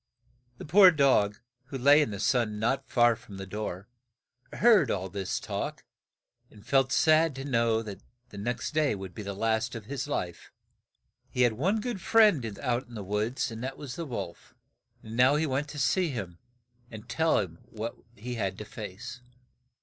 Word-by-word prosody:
The - - -8
poor 185 +5 +8
dog, 135 - +3 0.3
who 135 +1 -6
lay 145 +4 +6
in 150 - 0
the 100 -2 -6
sun 110 -1 +1
not 135 +5 -1
far 120 -1 +4
from 100 -2 -12
the 95 - -6
door, 100 -1 -5 0.6
heard 230 -4 +5
all 95 -1 -2
this 95 0 -3
talk, - - -4 0.7
and 105 0 -17
felt 135 +1 +2
sad 155 -2 +4
to 135 0 -6
know 115 -4 +1
that 105 -3 -8 0.3
the 100 - -9
next 120 +7 -3
day 150 -6 +2
would 95 -2 -8
be 105 - -7
the 100 -1 -5
last 115 +4 0
of 115 -3 -7
his 135 +3 -4
life. 90 - -4 0.8
He 125 - +1
had 120 -2 +3
one 185 - 0
good 215 -3 -4
friend 210 - +5 0.2
out 125 -1 -1
in 120 - -12
the 105 - -5
woods, 105 +6 -1
and 115 +1 -7
that 135 +1 -4
was 135 -4 -7
the 170 - -4
wolf; 125 - -7 0.5
and 110 +1 -8
now 125 +4 +5
he 155 +2 +1
went 140 +1 -1
to 150 - -8
see 175 +5 +2
him 95 - -6 0.5
and 110 -1 -10
tell 160 0 +2
him 85 -4 -3
what 115 +1 -5 0.2
he 120 +4 -6
had 95 -5 -2
to 105 - -7
face. 110 +4 -8
120 Hz, 190 wpm, -28 LUFS, 105-140 Hz, 0.8 s, poor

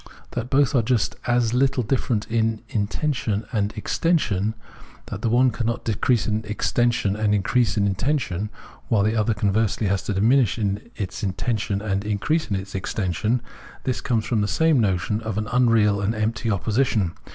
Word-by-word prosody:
That 120 - -4
both 140 0 +3
are 130 - +4
just 115 -1 0
as 120 -2 +2
httle 130 0 +1
difierent 115 -2 0
in 110 -1 0
intension 110 0 -1
and 105 -3 0
extension, 110 - 0 0.6
that - - -5
the 115 - 0
one 125 +2 +4
cannot 115 0 -2
decrease 115 +1 +1
in 110 0 -1
extension 115 0 +1
and 105 -1 +1
increase 110 +4 +1
in 100 - +3
intension, 105 - -1 0.4
while 105 -3 +2
the 110 +2 +1
other 110 0 +1
conversely 105 +1 +1
has 95 0 +1
to 105 - -1
diminish 115 +3 +3
its 105 -1 -4
intension 100 0 -2
and 100 -2 -1
increase 105 +10 -1
in 100 - 0
extension 95 +3 -2 0.2
— - - -19
this 130 - -2
comes 115 -3 0
from 115 -3 0
the 105 - +1
same 160 +3 +3
notion 100 0 0
of 110 -2 -4
an 105 0 -2
unreal 115 -5 +3
and 105 +3 0
empty 110 +1 -1
opposition. 110 -3 +1
110 Hz, 165 wpm, -23 LUFS, 100-120 Hz, 0.6 s, are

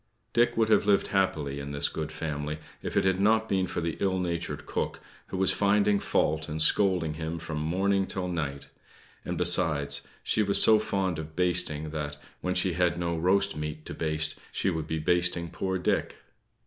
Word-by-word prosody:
Dick 120 -1 +2
would 110 -1 +2
have 110 - +3
lived 100 -1 +3
happily 75 -8 0
in 70 0 -6
this 70 - +2
good 80 -1 -4
family, 75 -1 -4 0.2
if - - -3
it - - +3
had 95 0 +2
not 110 +2 +3
been 95 -2 +1
for - - -3
the 85 -1 -3
ill 95 -1 +1
natured 85 -2 -3
cook, - - -3 0.3
who - - -5
was 95 0 +3
finding 100 0 +3
fault 80 -3 0
and 75 +1 -4
scolding 90 -2 +3
him 80 +1 -4
from 80 -2 -5
morning 95 +5 +1
till 95 -1 -3
night; 75 -6 -3 0.6
and, - - -4
besides, 75 -5 +2 0.2
she 110 - +1
was 100 -1 +3
so 110 -1 +7
fond 95 -6 -1
of 80 0 -8
basting, 85 -4 0
that, 75 -2 -4 0.2
when 90 0 -2
she 90 0 +1
had 90 0 +1
no 85 -1 -1
roast 100 +4 +2
meat 75 0 -5
to - - -6
baste, 80 -1 -1
she 95 - 0
would 80 -3 -3
be 80 - -2
basting 85 0 +1
poor 95 +1 -2
Dick. 90 - -1
85 Hz, 190 wpm, -28 LUFS, 80-95 Hz, 0.6 s, so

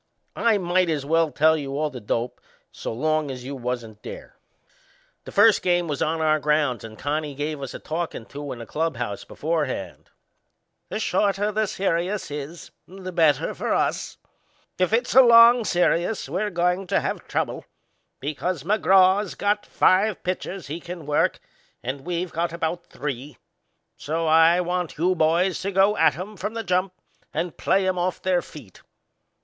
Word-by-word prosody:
I 230 -2 +3
might 180 -1 +1
as 150 -4 -1
well 165 +1 +2
tell 160 +2 +3
you 140 -2 -4
all 150 0 -1
the 125 -3 -8
dope, 115 +3 -3 0.3
so - - -6
long 155 +5 0
as 130 -2 -6
you 140 +2 -6
wasn't 120 -4 -5
there. - - -9 0.9
The - - -8
first 210 0 +5
game 175 -1 +1
was 145 -3 -3
on 160 +1 0
our 155 -1 +3
grounds 150 -5 +1
and 110 -1 -10
Connie 145 0 -2
give 150 +1 -3
us 135 - -6
a - - -6
talkin' 160 -7 -4
to 145 +2 -7
in - - -6
the 115 - -8
clubhouse 120 -7 -3
beforehand. 155 -4 -3 0.8
"The - - -3
shorter 205 +1 +1
this 215 -1 -1
serious 185 -1 -1
is," 150 +3 -7 0.2
he 185 - -14
says, 195 - -11
"the 185 - -5
better 160 -5 +2
for - - -1
us. - - -1 0.6
If 185 +1 +2
it's 240 +2 +1
a 265 - +9
long 235 0 +7
serious 180 +2 +1
we're 185 +9 -1
goin' 180 +1 0
to - - +2
have - - -4
trouble, - - -2 0.5
because 150 +3 -3
McGraw's 195 0 +3
got 205 +1 0
five 195 +2 +2
pitchers 185 0 -4
he 155 +4 -5
can 175 -2 -8
work 150 0 +1 0.4
and 135 +3 -4
we've 175 0 -2
got 170 +1 -1
about 170 +1 -3
three; 140 -1 -6 0.6
so 165 +3 -2
I 165 +2 +5
want 180 -2 -3
you 180 +4 +2
boys 170 +2 +1
to 195 - -2
go 195 +2 +4
at - - +3
'em 200 +4 -7
from 210 +4 -4
the 230 - -3
jump 185 0 0 0.4
and 165 +1 -3
play 190 0 +1
'em 185 -1 0
off 180 0 -1
their 185 -2 +1
feet. 120 - -13
170 Hz, 175 wpm, -24 LUFS, 145-185 Hz, 0.9 s, a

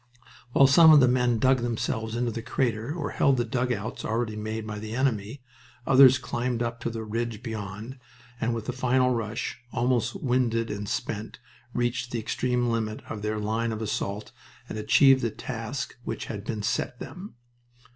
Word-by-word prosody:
While 135 - +7
some 160 +4 +8
of 150 - +9
the 130 - +5
men 125 -1 +2
dug 130 +4 +4
themselves 110 -1 -2
into 120 0 0
the 115 - -5
crater 115 0 -1
or 155 -2 -3
held 135 -2 +3
the 120 - +1
dugouts 120 -3 -2
already 110 -1 -1
made 110 +1 -4
by 105 -1 -5
the 110 +1 -6
enemy, 125 -1 -1 0.4
others 130 -1 +7
climbed 120 -1 -2
up 115 0 -3
to 120 - -2
the 115 -1 -5
ridge 115 +1 -3
beyond 110 +2 -6 0.4
and 115 +1 0
with 115 -2 -5
a - - 0
final 125 0 +2
rush, 110 +1 -3
almost 120 -1 0
winded 120 -3 0
and 105 0 -4
spent, 105 +1 -4 0.4
reached 120 0 -1
the 120 - -3
extreme 125 +2 0
limit 110 -2 -2
of 105 - -5
their 105 +1 -2
line 110 +2 -1
of 110 - -4
assault 105 -1 -3 0.4
and 110 - -5
achieved 130 +5 +5
the 115 - 0
task 115 +4 -5
which 115 - -4
had 105 -2 -6
been 110 -3 -3
set 120 +3 -1
them. 185 - -9
115 Hz, 175 wpm, -27 LUFS, 110-125 Hz, 0.4 s, of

